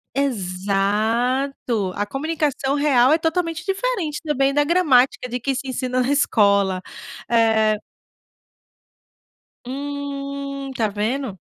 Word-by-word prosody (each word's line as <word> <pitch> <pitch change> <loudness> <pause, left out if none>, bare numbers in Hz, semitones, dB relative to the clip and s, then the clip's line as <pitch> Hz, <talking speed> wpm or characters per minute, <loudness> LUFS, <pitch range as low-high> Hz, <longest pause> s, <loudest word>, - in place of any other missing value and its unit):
Exato! 215 +1 0
A 205 - 0
comunicação 280 +1 -1
real 280 -2 +4
é 320 - +4
totalmente 330 0 -1
diferente 390 -6 -2
também 275 -3 +1
da 290 +1 +3
gramática 290 -7 +3
de 245 +1 -3
que 270 +3 -1
se 270 - -4
ensina 255 -1 -1
na 255 - -1
escola 200 -8 +2 0.5
eh 220 -2 +3 1.9
Hum, 280 0 -5
tá 220 -2 +1
vendo? 215 +1 -3
270 Hz, 105 wpm, -21 LUFS, 220-285 Hz, 1.9 s, real